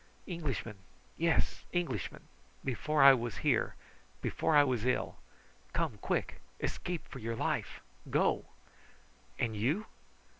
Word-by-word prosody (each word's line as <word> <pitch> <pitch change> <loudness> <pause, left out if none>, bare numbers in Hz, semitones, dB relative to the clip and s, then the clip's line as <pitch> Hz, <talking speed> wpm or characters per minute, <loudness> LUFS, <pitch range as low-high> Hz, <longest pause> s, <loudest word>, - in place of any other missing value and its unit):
"Englishman! 145 - -3 0.4
yes 165 0 +1
Englishman! 155 - -2 0.4
Before 140 +3 +2
I 135 0 +11
was 120 -6 -2
here - - +2 0.4
before 160 - +1
I 145 - +9
was 125 -6 0
ill! 125 +1 0 0.6
Come, - - -1
quick! - - -1 0.2
escape 175 -2 -3
for 135 - -8
your 115 0 -3
life! - - -1 0.3
Go!" - - +2 0.9
"And 110 -2 0
you?" 145 - +1
135 Hz, 115 wpm, -33 LUFS, 115-160 Hz, 0.9 s, I